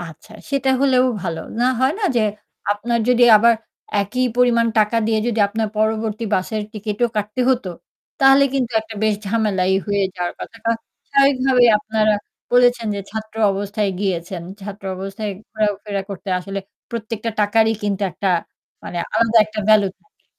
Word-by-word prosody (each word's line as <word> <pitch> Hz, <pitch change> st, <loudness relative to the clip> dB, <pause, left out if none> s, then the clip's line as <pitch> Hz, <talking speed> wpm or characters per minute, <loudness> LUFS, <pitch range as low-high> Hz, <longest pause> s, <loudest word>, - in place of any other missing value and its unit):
আচ্ছা 175 Hz, +5 st, -11 dB, 0.2 s
সেটা 275 Hz, -1 st, +1 dB
হলেও 260 Hz, -2 st, +4 dB, 0.2 s
ভালো। 165 Hz, -1 st, -3 dB, 0.2 s
না 245 Hz, -, +3 dB, 0.2 s
হয় 260 Hz, +3 st, +3 dB
না 420 Hz, -, -2 dB
যে 230 Hz, -, +4 dB, 0.5 s
আপনার 235 Hz, +3 st, -1 dB
যদি 250 Hz, -1 st, +4 dB
আবার 230 Hz, +2 st, +5 dB, 0.5 s
একই 250 Hz, +6 st, -1 dB
পরিমাণ 240 Hz, -2 st, +3 dB
টাকা 215 Hz, +2 st, +2 dB
দিয়ে 220 Hz, -1 st, +1 dB
যদি 230 Hz, -2 st, -1 dB
আপনার 220 Hz, +1 st, -2 dB
পরবর্তী 220 Hz, 0 st, 0 dB
বাসের 210 Hz, +3 st, -1 dB
টিকিটও 215 Hz, +2 st, -1 dB
কাটতে 210 Hz, +4 st, -2 dB
হত। 255 Hz, -3 st, +1 dB, 0.6 s
তাহলে 270 Hz, +1 st, +6 dB
কিন্তু 250 Hz, -3 st, -1 dB
একটা 220 Hz, 0 st, -10 dB
বেশ 215 Hz, -1 st, +3 dB
ঝামেলাই 195 Hz, -4 st, +1 dB
হয়ে 200 Hz, -1 st, +1 dB
যাওয়ার 175 Hz, -1 st, -2 dB
কথা 225 Hz, -, -9 dB, 0.5 s
স্বভাবিকভাবে 270 Hz, -2 st, +4 dB
আপনারা 215 Hz, 0 st, +1 dB, 0.4 s
বলেছেন 245 Hz, -1 st, +4 dB
যে 200 Hz, -, -3 dB
ছাত্র 220 Hz, 0 st, -7 dB, 0.2 s
অবস্থায় 200 Hz, +1 st, -2 dB
গিয়েছেন। 180 Hz, -2 st, -2 dB, 0.2 s
ছাত্র 200 Hz, 0 st, -9 dB
অবস্থায় 195 Hz, +3 st, -5 dB, 0.2 s
ঘোরাফেরা 205 Hz, -2 st, -2 dB
করতে 195 Hz, 0 st, -7 dB
আসলে 195 Hz, +2 st, -5 dB, 0.3 s
প্রত্যেকটা 230 Hz, -1 st, -4 dB
টাকারই 220 Hz, +2 st, +3 dB
কিন্তু 205 Hz, -1 st, -1 dB
একটা 195 Hz, +4 st, -2 dB, 0.6 s
মানে 175 Hz, -, -5 dB
আলাদা 230 Hz, 0 st, +4 dB
একটা 215 Hz, 0 st, -5 dB
ভ্যালু 215 Hz, -2 st, +6 dB
থাকে। 425 Hz, -, -38 dB
215 Hz, 150 wpm, -20 LUFS, 205-235 Hz, 0.6 s, তাহলে